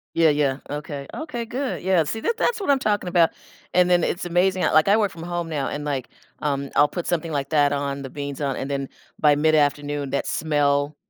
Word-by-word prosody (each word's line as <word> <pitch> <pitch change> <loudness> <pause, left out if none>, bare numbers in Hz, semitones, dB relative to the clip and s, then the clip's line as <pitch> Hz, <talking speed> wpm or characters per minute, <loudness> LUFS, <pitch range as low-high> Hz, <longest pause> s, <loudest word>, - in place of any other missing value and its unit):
Yeah, 165 -1 +5
yeah, 145 -3 +1
okay, 145 -1 -5
okay, 300 -7 -4
good. 255 +3 -3
Yeah, 180 -2 +3
see, 190 +9 -3
that 455 - -1
that's 455 -2 0
what 385 - -3
I'm 280 - +5
talking 210 -7 0
about. 170 -2 +4 0.4
And 180 0 +4
then 175 -1 +4
it's 175 - -1
amazing 180 +2 +1
I - - +2
like, 155 +3 +4
um, 200 - +5
I - - +5
work 205 -3 +1
from 165 - -9
home 175 -1 -3
now 145 -4 -2
and, 145 0 -5
like, 135 -4 -2 0.3
um, 140 -2 -2
I'll 145 - +6
put 175 +3 -5
something 165 -1 -1
like 140 -2 -2
that 145 -2 +3
on- 140 0 -2
the 135 - -7
beans 140 -1 -5
on- 140 -3 -1
and 135 - -4
then 140 -1 -3 0.3
by 150 -1 +5
mid-afternoon, 145 -2 +1
that 140 - -1
smell 145 -1 +1
150 Hz, 230 wpm, -23 LUFS, 145-180 Hz, 0.4 s, I'll